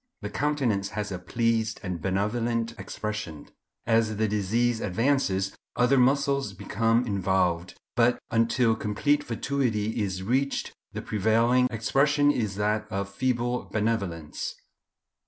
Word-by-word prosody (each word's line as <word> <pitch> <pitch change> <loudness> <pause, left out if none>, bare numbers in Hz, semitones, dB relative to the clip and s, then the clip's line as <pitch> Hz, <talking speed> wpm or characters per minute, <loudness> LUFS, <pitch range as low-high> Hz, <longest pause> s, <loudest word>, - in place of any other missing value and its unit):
The - - -4
countenance 125 -10 0
has 105 -1 -2
a 90 - -4
pleased 110 +3 0
and 90 -4 -4
benevolent 115 +5 0
expression. 105 -8 -5 0.4
As 115 -2 +2
the 110 0 +2
disease 110 +3 +1
advances 100 -3 +1 0.2
other 125 +2 +4
muscles 140 -2 +2
become 115 +5 +1
involved, 95 -4 0 0.2
but 120 0 +4
until 115 0 +3
complete 145 +8 +1
fatuity 115 -4 -1
is 95 -2 -2
reached, 135 +6 0 0.2
the - - -6
prevailing 115 +4 +3
expression 145 +6 +2
is 110 -8 -2
that 105 +1 0
of 100 -1 -3
feeble 125 +1 -1
benevolence." 100 -8 -2
110 Hz, 120 wpm, -27 LUFS, 100-125 Hz, 0.4 s, other